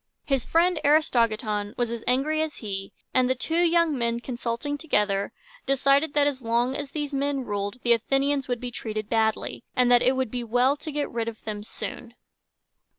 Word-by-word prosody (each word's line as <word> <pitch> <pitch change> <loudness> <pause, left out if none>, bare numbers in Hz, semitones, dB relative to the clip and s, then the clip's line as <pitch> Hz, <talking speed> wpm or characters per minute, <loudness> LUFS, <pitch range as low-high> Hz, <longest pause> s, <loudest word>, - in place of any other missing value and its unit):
His 270 -4 0
friend, 340 0 +3
Aristogiton, 225 -8 +2
was 240 -1 0
as 235 -1 -5
angry 285 +5 +2
as 315 -1 -2
he; 195 -3 -5 0.2
and 255 -1 +3
the 260 - +2
two 325 +6 0
young 335 -2 +3
men, 235 -2 0
consulting 240 +3 -3
together, 210 -10 0 0.4
decided 275 +2 +3
that 290 -1 +4
as 280 -2 -1
long 240 +3 +1
as 285 -1 -4
these 295 -1 -4
men 280 0 0
ruled, 205 +3 -3
the 240 - +5
Athenians 270 +4 +1
would 245 -2 -1
be 245 0 -5
treated 215 -2 -5
badly, 220 0 0
and 250 -1 +3
that 245 -1 +6
it 255 +2 +3
would 260 -4 -1
be 245 -1 -3
well 245 +4 +2
to 305 +2 -7
get 295 0 -2
rid 230 -1 -2
of 225 -1 -6
them 210 -1 -4
soon. 235 +2 -7
250 Hz, 190 wpm, -26 LUFS, 230-285 Hz, 0.4 s, that